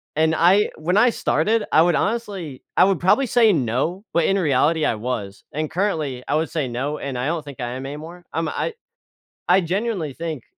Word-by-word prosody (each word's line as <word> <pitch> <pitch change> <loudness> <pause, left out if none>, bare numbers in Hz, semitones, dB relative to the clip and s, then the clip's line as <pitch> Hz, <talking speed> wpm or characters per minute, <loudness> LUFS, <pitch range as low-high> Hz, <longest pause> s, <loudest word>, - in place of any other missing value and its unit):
and 160 +1 +2
I 185 +6 +4
when 175 +5 0
I 245 +3 +6
started 215 +2 +1
I 155 - +6
would 170 -2 +3
honestly 195 - -3
I - - +7
would 190 -3 +2
probably 230 +9 +3
say 235 -2 +4
no, 145 - -1
but 170 -1 +3
in 195 - +2
reality 155 0 +2
I 115 - +1
was, 105 -4 -5
and 155 +1 -3
currently 155 -10 -1
I 145 - +1
would 160 0 0
say 150 -5 -1
no 135 +5 -3
and 135 -3 -4
I 125 - -2
don't 165 -1 -2
think 140 -3 -11
I 120 -1 -3
am 130 +1 -6
anymore. 160 +5 -9
I'm 165 0 -1
I 460 - -2 0.8
I 185 +2 +6
genuinely 185 - -2
think 160 -4 -5
160 Hz, 205 wpm, -22 LUFS, 140-190 Hz, 0.8 s, I